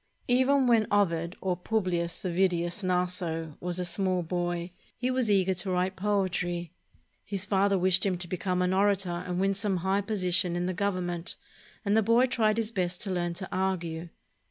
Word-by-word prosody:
Even 260 +2 +3
when 230 -3 +4
Ovid, 170 -4 +1
or 185 -2 0
Publius 180 -2 -1
Ovidius 175 0 0
Naso, 180 -4 -1
was 180 0 -3
a 180 - -2
small 185 0 0
boy, 175 +1 -2 0.3
he 250 +1 -1
was 255 -3 0
eager 190 -2 +3
to 185 +1 -1
write 185 +1 0
poetry. 185 -4 -1 0.5
His 195 -1 -3
father 200 0 +2
wished 185 0 +4
him 190 -3 +1
to 175 0 -3
become 180 +1 -1
an 180 +1 +1
orator 195 -1 +2
and 180 +1 -3
win 195 +1 +2
some 195 -1 -1
high 195 +1 +2
posi 195 -4 -2
tion 175 -1 +4
in 175 0 -1
the 185 - -1
Government, 180 -3 -2 0.5
and 200 +1 +2
the 220 - +5
boy 230 +4 +4
tried 225 -4 +1
his 225 -1 0
best 180 -4 -1
to 200 - -3
learn 175 -1 -1
to 190 +1 -5
argue. 175 -3 -2
185 Hz, 180 wpm, -28 LUFS, 175-200 Hz, 0.5 s, the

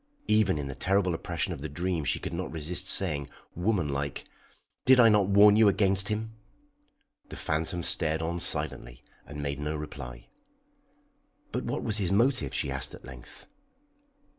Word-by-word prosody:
Even 105 -5 +3
in 70 -2 -4
the 70 - -5
terrible 95 +6 +1
oppression 85 -1 -3
of - - -9
the - - -5
dream 85 +2 -2
she 65 - 0
could - - -6
not - - -4
resist 85 +4 -3
saying, 75 -9 0 0.2
woman 90 -2 0
like: 70 0 -3 0.6
"Did 130 0 +6
I 115 -2 +8
not 105 -3 +3
warn 100 +1 +7
you 110 0 +6
against 100 0 +3
him?" 110 +1 -3 1.0
The - - -8
phantom 85 +3 -2
stared 80 -2 +1
on 85 +2 -2
silently - - -1 0.2
and 75 0 -7
made 70 -1 -3
no 75 +1 -3
reply. 60 -5 -8 1.3
"But - - -3
what - - -3
was 110 -2 0
his 95 -3 0
motive?" 100 - +2
she 70 - -2
asked 65 0 -3
at - - -15
length. 65 -1 -12
85 Hz, 165 wpm, -28 LUFS, 70-100 Hz, 1.3 s, I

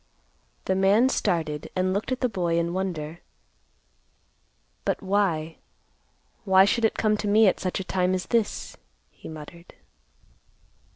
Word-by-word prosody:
The 190 - +1
man 200 +6 +4
started 155 - -1
and 185 0 +1
looked 205 +5 -2
at 255 - -2
the 250 - +3
boy 175 -6 -1
in 170 0 0
wonder; 170 -4 -4 1.6
"But - - -2
why, 185 -5 0 0.9
why 190 -2 +6
should 225 +3 +1
it 220 - 0
come 215 -1 +2
to 210 - -3
me 215 +2 +5
at 190 - +3
such 185 0 -2
a - - -3
time 185 0 0
as 185 - -3
this?" 230 -3 -1 0.3
he - - -12
muttered. 160 +2 -11
190 Hz, 140 wpm, -25 LUFS, 170-205 Hz, 1.6 s, why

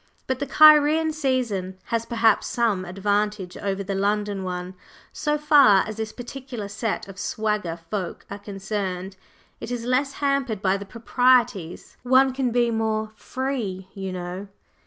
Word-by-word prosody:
But 260 -1 -2
the 285 - -3
Cairene 310 +2 +6
season 240 -11 -1
has 230 0 -2
perhaps 225 -3 +2
some 220 -6 0
advantage 200 0 -1
over 200 0 -2
the 195 +1 -3
London 205 0 -1
one 180 0 -4 0.4
so 300 0 0
far 285 -10 +6
as 215 0 -6
this 220 -1 -3
particular 245 -3 -7
set 205 +1 -3
of 195 -1 -10
"swagger" 210 -7 -2
folk 195 -5 -4
are 200 - -7
concerned 195 -2 -4 0.4
it - - -7
is 240 -1 -4
less 265 +3 +1
hampered 275 -7 0
by 190 -1 +2
the 200 0 -5
proprieties. 235 -6 +1
One 260 +1 +4
can 260 -1 0
be 240 0 +2
more 220 -1 -1
"free," 225 -10 -4
you 195 -1 -5
know! 180 +2 -6
215 Hz, 150 wpm, -24 LUFS, 195-255 Hz, 0.4 s, Cairene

